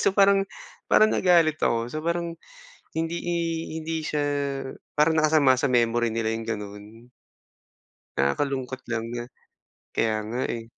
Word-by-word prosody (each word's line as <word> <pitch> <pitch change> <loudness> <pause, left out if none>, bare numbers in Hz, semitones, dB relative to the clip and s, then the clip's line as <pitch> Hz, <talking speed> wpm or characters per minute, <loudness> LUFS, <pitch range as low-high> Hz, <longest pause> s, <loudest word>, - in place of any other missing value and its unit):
So, 195 - +2
parang 195 -1 +5 0.4
parang 215 0 +5
nagalit 170 -4 +4
ako. 115 +1 0
So, 155 - -3
parang 170 +1 -1 0.7
hindi 165 +1 -1
i 175 0 -1 0.4
hindi 160 0 -3
siya 150 -1 -1 0.7
parang 155 +2 +4
nakasama 150 -4 +5
sa 130 +2 0
memory 120 -1 +2
nila 110 0 -1
yung 115 - -4
gano'n. 105 +3 -8 1.1
Nakakalungkot 130 - -1
lang 115 -1 -1
na 120 0 -3 0.7
kaya 110 -1 +1
nga, 120 +4 -3
eh. 115 - -7
130 Hz, 135 wpm, -25 LUFS, 115-165 Hz, 1.1 s, parang